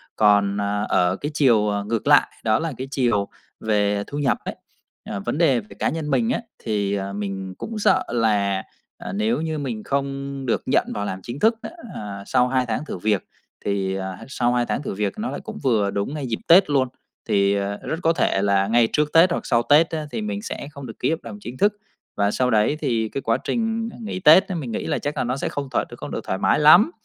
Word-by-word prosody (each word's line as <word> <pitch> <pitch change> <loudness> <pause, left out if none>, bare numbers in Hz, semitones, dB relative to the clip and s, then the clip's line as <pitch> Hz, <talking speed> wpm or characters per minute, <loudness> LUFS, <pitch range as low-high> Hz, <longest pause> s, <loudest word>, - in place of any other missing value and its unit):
Còn, 100 -1 +3
ờ, 100 0 -1
ở 90 +1 +2
cái 145 +8 -4
chiều, 115 -8 +3
à, 100 0 -1
ngược 110 +1 -2
lại, - - +6 0.2
đó 110 0 +2
là 165 -2 -3
cái 130 +1 -5
chiều 115 -8 +1 0.3
về 105 -2 +1
thu 145 - -6
nhập 140 -3 +1
ấy, - - -4 0.5
à, 100 - -5
vấn 120 +8 -3
đề 140 -8 +4
về 105 - -11
cái - - -12
cá - - +1
nhân 155 -2 -4
mình 230 -1 +2
á, 245 - 0 0.2
thì, 100 -3 0
à, 100 0 -4
mình 95 -2 -4
cũng 225 -1 -5
sợ - - +3
là, 105 -5 +1 0.3
à, - - -7
nếu 220 -1 0
như 160 -1 -2
mình 120 -6 -4
không 140 0 -3
được 120 - 0
nhận - - +2
vào 100 0 -3
làm 95 - -4
chính 120 +4 -6
thức 225 +1 +4
á, - - -6 0.3
à, 100 -2 -6
sau 125 +4 +2
2 130 0 +1
tháng 130 +6 -2
thử - - -5
việc 105 0 0 0.4
thì, 95 -1 -1
à, 95 -1 -4
sau 125 -3 0
2 120 -1 +1
tháng 145 - -2
thử - - -4
việc 100 0 -1
nó 225 - -2
lại - - -4
cũng 220 -1 -7
vừa 110 -7 +2
đúng 100 +8 -2
ngay 145 -4 -4
dịp 115 - -2
Tết 180 0 +7
luôn, 135 -3 +2 0.4
thì, 100 -1 +3
à, 100 0 -2
rất 160 - -3
có 165 - +4
thể 95 - +1
là 100 -1 +2
ngay 115 0 +4
trước 150 0 +1
Tết 170 +2 +6
hoặc - - -2
sau 120 -2 +2
Tết 155 +6 +5
á 155 -2 -3
thì 220 - -3
mình 210 -1 -3
sẽ 175 -9 -6
không 140 -2 -9
được 115 - -10
ký - - +1
hợp 160 - 0
đồng 105 -3 -8
chính 120 +4 -8
thức. 205 +5 +3 0.4
Và 100 0 +2
sau 125 +2 +1
đấy 110 +7 +2
thì 115 -6 0
cái 135 - -4
quá 115 -1 +1
trình, 225 0 -1
à, - - -12
nghỉ 215 -4 -4
Tết 180 +2 +7
á, 185 - -4
mình 135 -8 -4
nghĩ - - -3
là - - -1
chắc 145 0 -4
là - - +1
nó 125 +2 -2
sẽ - - -2
không 140 -1 -4
thoải - - +1
không - - -7
được - - -3
thoải 95 - -1
mái - - +2
lắm, 175 - +7
120 Hz, 250 wpm, -23 LUFS, 100-150 Hz, 0.5 s, Tết